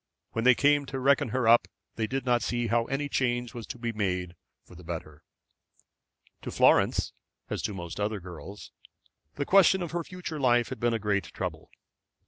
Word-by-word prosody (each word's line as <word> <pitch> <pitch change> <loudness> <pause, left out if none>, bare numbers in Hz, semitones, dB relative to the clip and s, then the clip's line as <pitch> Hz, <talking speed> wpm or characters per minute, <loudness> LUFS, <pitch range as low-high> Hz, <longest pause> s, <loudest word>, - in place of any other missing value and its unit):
When 115 +1 -2
they 125 -1 +7
came 145 +1 +3
to 135 0 -4
reckon 135 -1 +3
her 125 +1 0
up 120 +1 +6 0.3
they 110 -1 -1
did 130 +3 -3
not 120 -1 +2
see 120 -1 -1
how 115 0 +1
any 140 +3 -2
change 120 -4 -1
was 120 -2 -7
to - - -7
be 115 -1 -3
made 90 -4 -2 0.3
for - - -16
the 90 +1 -13
better. 80 -3 -7 1.2
To - - -6
Florence, - - +3 0.4
as - - -2
to 105 - -3
most 85 -1 -7
other 105 0 -1
girls, 90 +2 -10 0.6
the 145 - -2
question 190 0 +5
of 170 - -5
her 170 0 -2
future 180 -3 -7
life 120 -3 +3
had 130 - -6
been 120 -1 +1
a - - +1
great 105 -2 0
trouble. - - -6
120 Hz, 190 wpm, -28 LUFS, 105-135 Hz, 1.2 s, they